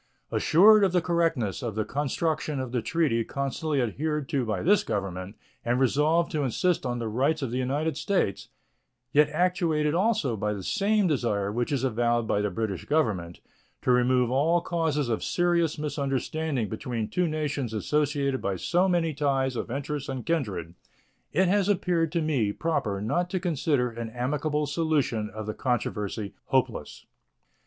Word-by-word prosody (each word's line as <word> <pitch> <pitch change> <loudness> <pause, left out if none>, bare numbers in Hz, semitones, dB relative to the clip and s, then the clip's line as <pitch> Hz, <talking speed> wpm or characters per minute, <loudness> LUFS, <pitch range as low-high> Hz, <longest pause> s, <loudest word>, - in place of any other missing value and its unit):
Assured 210 +5 +6
of 190 -2 +2
the 180 - +3
correctness 165 - 0
of 115 -4 -4
the 110 -1 -1
construction 150 +3 -1
of 130 -2 -4
the 125 -2 0
treaty 125 -2 +1
constantly 140 +3 -2
adhered 150 +5 -2
to 140 -5 0
by 105 -5 -2
this 200 +5 +4
Government 95 -1 -4 0.3
and 120 +1 +1
resolved 150 +6 +2
to 155 - -1
insist 145 +4 0
on 120 0 -2
the 115 -1 -3
rights 140 +7 0
of 125 - -3
the 125 - -1
United 140 +4 -1
States, 150 - -1 0.6
yet 150 +1 +4
actuated 160 -2 +1
also 185 - +1
by 105 0 -1
the 100 -2 -6
same 210 - +1
desire 115 - 0
which 120 +5 -2
is 135 -3 0
avowed 120 -1 +1
by 105 - +1
the 105 - 0
British 100 -1 -3
Government, 105 - 0 0.4
to - - +3
remove 125 0 +3
all 155 +6 +3
causes 160 -5 -1
of 115 -2 -1
serious 170 -3 +1
misunderstanding 145 -2 -2
between 110 0 -3
two 180 -1 0
nations 150 -6 -2
associated 140 +3 0
by 100 - -1
so 180 - +1
many 170 -3 +1
ties 135 -2 0
of 115 - -4
interest 145 +2 -4
and 130 -2 -4
kindred, 100 - -2 0.6
it 190 0 +3
has 200 +1 +2
appeared 175 -4 +1
to 170 -1 0
me 130 -10 +1
proper 125 -8 -1
not 175 +12 0
to 185 - -1
consider 145 -7 0
an 115 0 -5
amicable 145 +5 -1
solution 145 -8 0
of 110 0 -7
the 110 - -3
controversy 105 -5 -2
hopeless. - - -1
140 Hz, 165 wpm, -27 LUFS, 115-160 Hz, 0.6 s, Assured